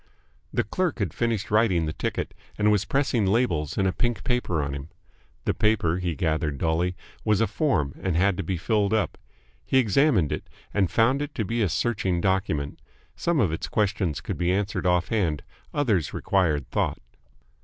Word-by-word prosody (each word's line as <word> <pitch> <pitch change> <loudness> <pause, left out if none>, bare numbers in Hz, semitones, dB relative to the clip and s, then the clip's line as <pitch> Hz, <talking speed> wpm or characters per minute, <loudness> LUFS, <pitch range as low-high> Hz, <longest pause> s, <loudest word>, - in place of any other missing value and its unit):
The - - +1
clerk 175 - -1
had 100 -9 -2
finished 115 -5 -1
writing 105 -6 +3
the 75 - -3
ticket, - - -3 0.2
and 105 0 +3
was 105 -1 +2
pressing 130 -7 +1
labels 95 - +1
and 95 - +2
a 95 - +1
pink 120 -1 -1
paper 105 - 0
on 70 0 -3
him. 70 +2 -6 0.6
The - - +2
paper, 100 -6 +2
he 90 -3 -2
gathered 80 -2 0
dully, 85 +4 0 0.3
was 105 -2 +2
a 115 - +4
form 110 - 0
and 95 -4 0
had 95 +3 +3
to - - -2
be 90 +2 -2
filled 105 +4 +1
up. 110 - 0 0.5
He 130 - +1
examined 120 - +3
it, - - -4 0.2
and 95 -4 +2
found 130 +5 +3
it 145 - -5
to 110 - -1
be 115 +4 -1
a 100 - +2
searching 95 -4 0
document. 90 -7 -1 0.3
Some 170 -3 0
of 100 - +3
its 80 - -3
questions 100 - 0
could - - -5
be 85 +1 +2
answered 95 -2 0
off 90 -1 +2
hand, 90 -10 0 0.3
others 110 - 0
required 80 -9 +1
thought. - - 0
95 Hz, 185 wpm, -26 LUFS, 85-115 Hz, 0.6 s, a